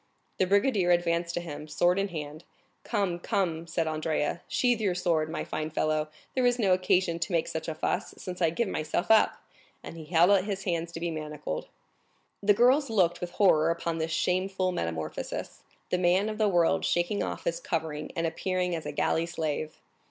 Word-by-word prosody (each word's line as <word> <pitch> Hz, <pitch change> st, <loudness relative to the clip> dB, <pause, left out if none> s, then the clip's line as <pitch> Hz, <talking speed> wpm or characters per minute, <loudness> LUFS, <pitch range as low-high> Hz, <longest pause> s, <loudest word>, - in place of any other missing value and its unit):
The 185 Hz, -, +3 dB
brigadier 200 Hz, -1 st, +3 dB
advanced 170 Hz, -1 st, +1 dB
to 175 Hz, -, -1 dB
him, 150 Hz, -2 st, -7 dB
sword 175 Hz, +5 st, +2 dB
in 200 Hz, -, +1 dB
hand. 155 Hz, -3 st, -7 dB, 0.4 s
"Come, 195 Hz, -6 st, -1 dB
come," 170 Hz, -3 st, -1 dB
said 165 Hz, 0 st, -1 dB
Andrea, 155 Hz, +1 st, -1 dB
"sheathe 245 Hz, -3 st, +1 dB
your 190 Hz, -4 st, +1 dB
sword, 165 Hz, -3 st, +1 dB
my 160 Hz, -, -3 dB
fine 155 Hz, 0 st, -4 dB
fellow; 155 Hz, 0 st, 0 dB, 0.3 s
there 260 Hz, -, +1 dB
is 245 Hz, 0 st, +3 dB
no 200 Hz, -6 st, +3 dB
occasion 180 Hz, -2 st, +2 dB
to 175 Hz, -, -2 dB
make 165 Hz, -2 st, +1 dB
such 160 Hz, 0 st, -4 dB
a 160 Hz, -, -3 dB
fuss, 180 Hz, +5 st, -2 dB
since 180 Hz, 0 st, -7 dB
I 165 Hz, -, +4 dB
give 220 Hz, +8 st, -1 dB
myself 155 Hz, +4 st, -1 dB
up;" 220 Hz, -, +4 dB, 0.4 s
and -, -, -8 dB
he 160 Hz, -2 st, -9 dB
held 170 Hz, +3 st, +4 dB
out 195 Hz, -2 st, +4 dB
his 195 Hz, -2 st, -3 dB
hands 170 Hz, -2 st, -2 dB
to 165 Hz, -, -5 dB
be 170 Hz, 0 st, -2 dB
manacled. 150 Hz, -, -5 dB, 0.7 s
The 205 Hz, +1 st, +5 dB
two -, -, -8 dB
girls 260 Hz, +3 st, +4 dB
looked 185 Hz, -6 st, +2 dB
with 175 Hz, -1 st, -5 dB
horror 165 Hz, -6 st, +4 dB
upon 170 Hz, 0 st, -2 dB
this 160 Hz, 0 st, -1 dB
shameful 185 Hz, +2 st, 0 dB
metamorphosis, 80 Hz, -, -4 dB, 0.3 s
the 180 Hz, -, +2 dB
man 185 Hz, +4 st, +3 dB
of 215 Hz, 0 st, -5 dB
the 215 Hz, -1 st, +3 dB
world 175 Hz, -3 st, +2 dB
shaking 175 Hz, +4 st, +1 dB
off -, -, -4 dB
his -, -, -1 dB
covering 160 Hz, -, -3 dB
and 165 Hz, -1 st, 0 dB
appearing 180 Hz, +2 st, -1 dB
as 160 Hz, -, -5 dB
a -, -, -3 dB
galley 165 Hz, +1 st, 0 dB
slave. 155 Hz, -2 st, -3 dB
175 Hz, 195 wpm, -28 LUFS, 160-195 Hz, 0.7 s, The